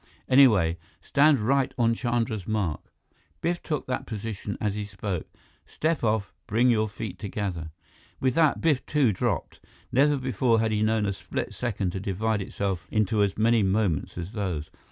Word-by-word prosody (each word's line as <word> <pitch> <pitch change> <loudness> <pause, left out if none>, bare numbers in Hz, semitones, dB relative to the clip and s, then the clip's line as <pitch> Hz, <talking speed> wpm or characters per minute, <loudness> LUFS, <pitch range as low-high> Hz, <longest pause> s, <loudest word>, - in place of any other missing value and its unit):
Anyway, 105 -11 +5 0.2
stand 145 0 +4
right 135 +4 +1
on 115 -1 +3
Chandra's 115 -4 -1
mark" 100 -8 -1 0.6
Biff 175 +1 -1
took 150 -3 -3
that 125 - -3
position 105 -2 -5
as 105 -2 0
he 105 0 -3
spoke 100 -3 -4 0.4
"step 160 -3 -1
off, 110 -3 0
bring 120 +4 +3
your 110 -2 +1
feet 100 -3 -6
together 95 -6 -4 0.3
" - - -30
With 130 -1 +1
that, 160 0 +3
Biff, 150 -5 +2
too, 140 -8 +3
dropped. - - -2 0.3
Never 145 +3 +4
before 125 -3 +1
had 110 0 +1
he 105 0 0
known 110 0 +2
a 100 - 0
split - - -5
second 105 -6 -2
to 95 - -4
divide 100 +3 -1
itself 95 -2 -3
into 110 0 +1
as 100 -1 +1
many 115 +1 +4
moments 95 -6 0
as 85 +2 -5
those. 90 -8 -3
110 Hz, 170 wpm, -26 LUFS, 100-125 Hz, 0.6 s, Anyway